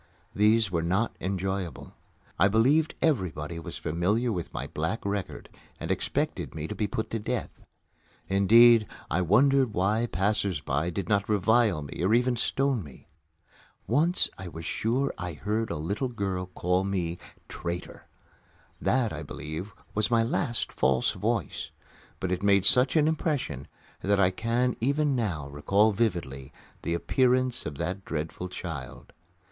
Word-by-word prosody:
These 105 0 +3
were 85 -2 +1
not 95 +7 0
enjoyable. 95 -4 -3 0.5
I 95 - +6
believed 130 +10 +3
everybody 85 - 0
was - - -7
familiar 100 +10 0
with 90 -5 -4
my - - -4
black 80 +10 -3
record 100 -1 -3 0.3
and - - -3
expected - - -2
me 80 0 -4
to - - -4
be 105 - -1
put 110 +3 -3
to 115 - -1
death. 105 - -3 0.8
Indeed, 110 +3 +6 0.2
I 90 - +2
wondered 125 - +3
why 105 +6 +1
passers 95 -2 0
by 75 +4 -1
did 90 0 -4
not 100 0 +1
revile 105 -5 +3 0.2
or 95 +4 +3
even 125 +1 +2
stone 135 -1 0
me. 70 -4 -14 0.8
Once 170 +5 +2
I 95 - -6
was 80 -1 -8
sure 125 +9 0
I 90 -1 -4
heard 105 +8 -2
a 85 - -2
little 100 - -2
girl 95 -5 -3
call 90 +1 0
me 90 -3 -2 0.3
"Traitor!" 85 0 -6 0.7
That, 125 -5 +1
I 75 - -5
believe, 80 +6 -6 0.2
was 105 +2 +1
my 115 -1 +3
last 120 +1 -1
"false 65 -1 +2
voice," 105 0 -2 0.5
but 95 - -2
it 90 0 -1
made 100 -1 +4
such 125 +7 +4
an 155 -1 +4
impression 145 - -1 0.3
that 100 0 +2
I 95 -1 +4
can 115 +5 0
even 140 +3 +2
now 90 - -2
recall 100 +10 +3
vividly 85 - -2 0.3
the 85 - -1
appearance 130 +6 +1
of 75 -2 -6
that 95 +5 -3
dreadful 80 +3 -4
child. 70 -8 -7
100 Hz, 150 wpm, -28 LUFS, 85-115 Hz, 0.8 s, I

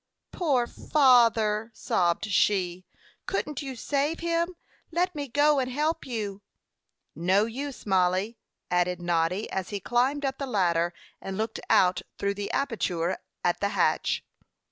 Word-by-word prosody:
"Poor 275 -9 +1
father," 230 -6 +3
sobbed 175 +2 +1
she. 185 -3 +1 0.4
"Couldn't 300 -8 -2
you 270 -2 -5
save 285 +6 -1
him? 340 +1 0 0.3
Let 355 +2 0
me 290 -2 -4
go 290 +3 +3
and 255 -1 -1
help 300 +4 -1
you." 205 -5 -4 0.7
"No 190 +5 +2
use, 270 +4 -6
Mollie," 190 +3 +1 0.3
added 180 0 +1
Noddy, 175 +3 0
as 190 -1 -3
he 205 - -3
climbed 255 +7 +1
up 270 0 -2
the 275 - -3
ladder, 175 -6 +1 0.3
and 195 0 -5
looked 220 +1 -2
out 180 -1 +4 0.2
through 200 0 0
the 200 0 -5
aperture 185 -10 -1 0.2
at 175 - +1
the 200 - 0
hatch. 165 -3 +1
220 Hz, 140 wpm, -27 LUFS, 185-275 Hz, 0.7 s, out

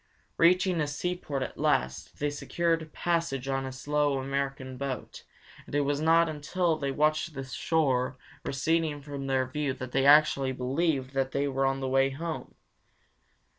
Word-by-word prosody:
Reaching 180 0 +4
a 150 - 0
seaport 150 -2 -3
at - - -7
last, 80 +8 0
they 145 0 -1
secured 165 +1 -1
passage 165 -7 -1
on 135 0 -1
a - - -5
slow 145 +1 0
American 135 -1 -3
boat, 130 -2 -5 0.4
and - - -6
it 145 - +3
was 145 +1 0
not 165 +1 +5
until 160 +3 0
they 140 -3 -2
watched 155 +3 +1
the 135 - -4
shore 130 -1 0 0.3
receding 155 +1 0
from 140 -1 -6
their 130 -1 +2
view 140 +1 -2
that 130 -1 -7
they 135 +1 +2
actually 140 -2 +5
believed 135 +1 -1
that 135 -1 -1
they 140 +1 +1
were 135 0 +1
on 135 0 -1
the 135 - -1
way 135 +1 +3
home. 160 +4 -5
140 Hz, 165 wpm, -29 LUFS, 135-155 Hz, 0.4 s, not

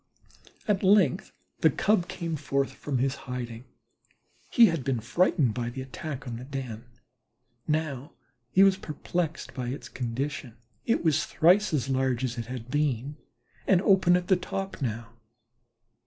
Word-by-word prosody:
At 205 -3 +2
length 190 -7 +3 0.3
the 160 - +5
Cub 180 +4 +1
came 165 -2 -4
forth 140 -1 -1
from 140 -3 -3
his 130 +2 +1 0.2
hiding. 120 -1 -5 0.8
He 235 - +7
had 165 - 0
been 130 -3 0
frightened 130 - +2
by 120 +1 -2
the 130 +2 -6
attack 140 +1 -6
on 115 -1 -4
the 120 - -8
den; 125 -4 -6 0.8
now 150 -2 -2 0.4
he 190 +9 +5
was 195 -1 +5
perplexed 165 0 -3
by 125 -3 -4
its 130 +4 -5
condition. 125 0 -4 0.3
It 230 - +2
was 155 -2 +2
thrice 185 +6 +4
as 140 -5 0
large 130 -2 0
as 125 -1 -2
it 115 - -5
had 125 -1 -7
been 145 -1 -1 0.5
and 190 - +5
open 190 -2 +4
at 180 0 -4
the 190 - +5
top 195 0 -5
now. 115 -2 -3
140 Hz, 155 wpm, -27 LUFS, 125-175 Hz, 0.8 s, He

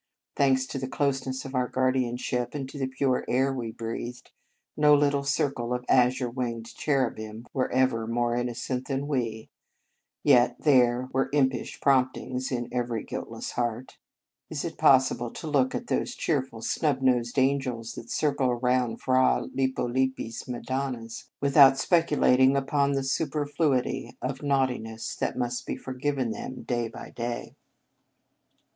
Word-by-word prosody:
Thanks 130 -2 +3
to 135 +1 -5
the 130 - -3
closeness 135 -1 -1
of 135 - -7
our 125 -1 +1
guardianship, 125 -1 -1
and 135 -2 -3
to 145 - -8
the 135 - 0
pure 130 -1 0
air 135 +2 +2
we 120 -4 -4
breathed, 115 +1 -6 0.4
no 150 -1 +6
little 140 -1 +2
circle 135 -4 0
of 125 0 -5
azure 125 0 +3
winged 115 -2 -4
cherubim 115 -6 -2
were 130 -2 0
ever 125 -3 +1
more 120 0 0
innocent 125 +1 -3
than 140 0 -2
we; 115 -6 -2 0.7
yet 120 0 +5
there 125 -3 +4
were 135 +1 +1
impish 135 -3 0
promptings 130 -1 +1
in 120 -2 -2
every 120 -3 -2
guiltless - - -6
heart. 120 +1 -3 0.5
Is 155 -1 -4
it 165 - -6
possible 130 -5 +4
to - - -8
look 140 -4 +1
at 240 - -3
those 245 - -1
cheerful, 130 -7 -2
snub 140 -4 0
nosed 120 -2 +2
angels 130 -4 0
that 115 - -9
circle 140 -4 +1
around 125 -1 0
Fra 130 0 +3
Lippo 130 -2 0
Lippi 130 0 -1
s 115 - -8
madonnas, 125 -2 -4
without 140 -1 +7
speculating 140 -6 +4
upon 140 +1 +1
the 135 -1 0
superfluity 145 -1 -1
of 130 +1 -4
naughtiness 130 -6 -1
that - - -2
must 120 -1 -2
be - - -2
forgiven 130 -1 -2
them 130 - -6
day 120 -2 -1
by - - -10
day? 120 0 -5
130 Hz, 145 wpm, -27 LUFS, 120-140 Hz, 0.7 s, without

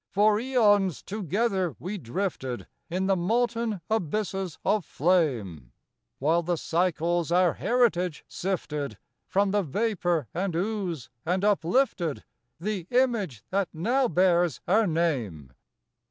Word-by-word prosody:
For 210 +1 +3
aeons 205 - +2
together 195 -2 -1
we 195 +3 -5
drifted 130 - -3 0.2
In 185 +3 -1
the 195 0 +3
molten 230 +2 0
abysses 195 -3 -2
of 210 -3 +2
flame, 120 - 0 0.4
While 160 +5 +2
the 175 +1 0
Cycles 170 0 0
our 180 -1 +4
heritage 185 -10 +1
sifted 150 - -3 0.3
From 200 0 +2
the 205 0 +2
vapor 175 - 0
and 185 -1 -2
ooze, 185 - -2
and 185 +4 0
uplifted 180 - +1 0.4
The 190 -1 -3
image 225 - +1
that 195 -2 +1
now 245 +11 +1
bears 175 - +2
our 215 +3 +4
name. 120 - -1
185 Hz, 115 wpm, -27 LUFS, 160-210 Hz, 0.4 s, our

